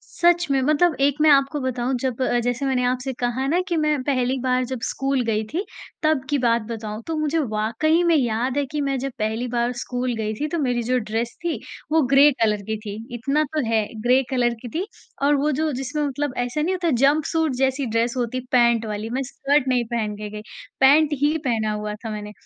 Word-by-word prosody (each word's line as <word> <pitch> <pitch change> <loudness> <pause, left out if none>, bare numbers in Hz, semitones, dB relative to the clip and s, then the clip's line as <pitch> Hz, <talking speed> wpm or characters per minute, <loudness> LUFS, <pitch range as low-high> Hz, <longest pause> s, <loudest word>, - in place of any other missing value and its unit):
सच 345 0 +3
में 270 -1 +3
मतलब 305 +4 +3
एक 280 0 +3
मैं 310 0 +6
आपको 280 +1 +3
बताऊँ 255 0 -1
जब 260 -1 -2
अ, 245 -1 +2
जैसे 245 +3 -1
मैंने 255 -2 +1
आपसे 255 +1 -1
कहा 245 +2 -1
ना 335 +6 +2
कि 345 - 0
मैं 300 -3 +1
पहली 255 -1 0
बार 255 0 +1
जब 255 -1 -5
स्कूल 270 -1 0
गई 220 -1 0
थी 360 +6 -1 0.4
तब 310 -4 +2
की 290 - +2
बात 235 -2 +2
बताऊँ, 220 -1 -5
तो 325 - -2
मुझे 310 +1 0
वाक़ई 245 +6 +1
में 340 -1 +4
याद 245 0 0
है 285 - +1
कि 300 +2 -4
मैं 275 -1 0
जब 275 +2 -3
पहली 220 +3 -1
बार 240 +1 +1
स्कूल 250 0 -2
गई 215 -1 -2
थी 295 +8 -3
तो 340 - -2
मेरी 245 -5 0
जो 250 +2 +1
ड्रेस 230 +1 -3
थी 325 -8 -1 0.3
वो 320 -1 +4
ग्रे 280 +2 +8
कलर 210 -2 +2
की 220 - 0
थी। 200 - -4 0.2
इतना 275 +6 0
तो 305 -4 +1
है 220 -1 +2 0.2
ग्रे 255 +2 +4
कलर 240 -2 +1
की 245 - -6
थी 380 - -2 0.4
और 285 +1 +4
वो 300 - +2
जो 315 - +1
जिसमें 270 +3 -3
मतलब 285 -1 -2
ऐसा 245 +4 -1
नहीं 360 +5 0
होता 350 -2 0
जंपसूट 310 +2 +2
जैसी 265 +1 0
ड्रेस 230 +1 0
होती 245 0 -1
है, 255 - -7
पैंट 235 -2 +4
वाली 215 +1 -4
मैं 260 +3 -1
स्कर्ट 275 +1 0
नहीं 250 -2 +2
पहन 215 -3 -1
के 210 0 -6
गई, 210 0 -7 0.4
पैंट 295 +3 +5
ही 295 +2 +3
पहना 220 -3 0
हुआ 210 0 -4
था 220 +1 -7
मैंने। 210 -1 -6
255 Hz, 225 wpm, -23 LUFS, 235-290 Hz, 0.4 s, ग्रे